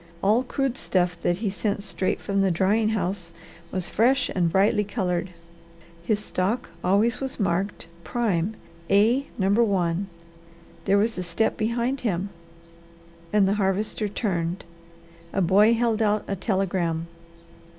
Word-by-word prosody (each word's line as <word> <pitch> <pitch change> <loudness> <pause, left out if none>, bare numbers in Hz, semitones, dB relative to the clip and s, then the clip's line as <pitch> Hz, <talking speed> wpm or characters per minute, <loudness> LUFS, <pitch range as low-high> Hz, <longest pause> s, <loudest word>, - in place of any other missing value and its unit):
All 215 +5 +4
crude 270 0 -2
stuff 175 -1 +1
that 175 - +1
he 200 - +1
sent 200 0 -2
straight 195 -2 -1
from 200 0 0
the 195 - +3
drying 200 +5 +2
house 185 -5 -2 0.4
was 185 -2 -2
fresh 255 +4 +2
and 175 -3 +1
brightly 200 +3 +3
coloured. 185 -4 -2 0.7
His 205 +5 +1
stock 210 +3 -2
always 215 +7 +2
was 265 -2 -4
marked 195 0 -1 0.2
prime 205 0 0 0.3
A 225 +8 +3
No. 190 -1 +1
1. 195 -4 +2 0.8
There 195 +1 +4
was 220 +3 +1
a - - -1
step 180 +5 0
behind 235 +4 -1
him 200 -4 -1 1.0
and 205 -2 +4
the 195 - +2
Harvester 205 +2 0
turned. 180 -5 -2 0.7
A - - 0
boy 205 +6 +5
held 230 -1 +1
out 210 -1 +2
a 200 - -1
telegram. 185 -5 -1
200 Hz, 140 wpm, -25 LUFS, 185-220 Hz, 1.0 s, boy